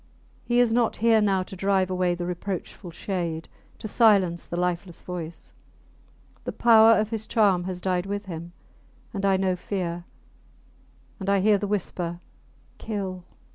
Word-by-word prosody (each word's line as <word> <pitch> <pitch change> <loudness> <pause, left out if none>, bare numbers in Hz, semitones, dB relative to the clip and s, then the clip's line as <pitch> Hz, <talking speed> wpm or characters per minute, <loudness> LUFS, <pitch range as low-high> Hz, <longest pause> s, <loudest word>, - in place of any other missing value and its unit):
He 240 0 +1
is 240 -2 +4
not 235 -1 +2
here 225 0 +4
now 195 -3 +2
to 190 - -10
drive 190 0 +1
away 180 -1 +1
the 175 0 -4
reproachful 180 +1 -5
shade 170 -2 -4 0.3
to - - -6
silence 200 -6 +3
the 170 - -4
lifeless 175 0 -2
voice! 170 -2 -7 0.9
The - - -3
power 225 -1 +6
of 215 +1 -1
his 220 -1 -3
charm 195 -5 +3
has 180 -1 -4
died 180 0 -1
with 200 +1 -3
him. 170 -2 -7 0.6
And 200 -1 0
I 195 -1 +3
know 190 -1 +1
fear; 175 -2 -4 1.1
and 195 0 -3
I 200 0 +4
hear 205 +1 +4
the 205 - -2
whisper, 175 -4 -2 0.6
Kill! 190 -4 -4
190 Hz, 155 wpm, -25 LUFS, 175-210 Hz, 1.1 s, power